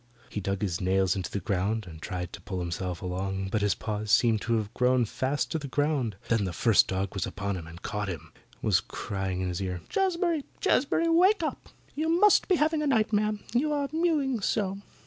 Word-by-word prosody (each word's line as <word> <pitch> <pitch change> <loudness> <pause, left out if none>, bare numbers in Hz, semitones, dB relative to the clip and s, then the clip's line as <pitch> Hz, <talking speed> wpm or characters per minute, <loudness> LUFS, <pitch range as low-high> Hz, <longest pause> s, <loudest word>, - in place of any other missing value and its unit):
He 105 - -3
dug 100 +1 -2
his 90 -5 -1
nails 95 0 +2
into 95 -3 -3
the 100 - -3
ground 100 +4 -1
and 80 -2 -10
tried 90 -1 -4
to - - -8
pull 95 -3 -4
himself 90 0 -3
along, 95 +1 -2
but 110 - +1
his 100 -2 +2
paws 105 -1 -4
seemed 110 0 +4
to 115 - 0
have 110 0 -3
grown 125 0 +3
fast 130 +6 -1
to 160 - 0
the 145 - -6
ground. 140 -6 0
Then 115 -3 +2
the 90 - -3
first 115 +1 +4
dog 95 0 -2
was 95 - -2
upon 100 -1 -3
him, 85 -3 -7
had 85 +2 -12
caught 105 -1 -3
him 80 -3 -6 0.3
was - - +4
crying 95 -2 -4
in 90 - -1
his 90 +1 -3
ear, 90 -2 -3
"Jazbury, 345 -5 +1 0.2
Jazbury, 290 +5 +2
wake 355 +3 +4
up. 310 - -4 0.2
You 315 +2 -1
must 365 +5 +5
be 375 - +4
having 310 0 +2
a 300 - 0
nightmare, 215 -4 +2 0.2
you 285 +6 +2
are 285 -1 -1
mewing 305 -7 +1
so." 195 -1 0
110 Hz, 210 wpm, -28 LUFS, -, 0.3 s, must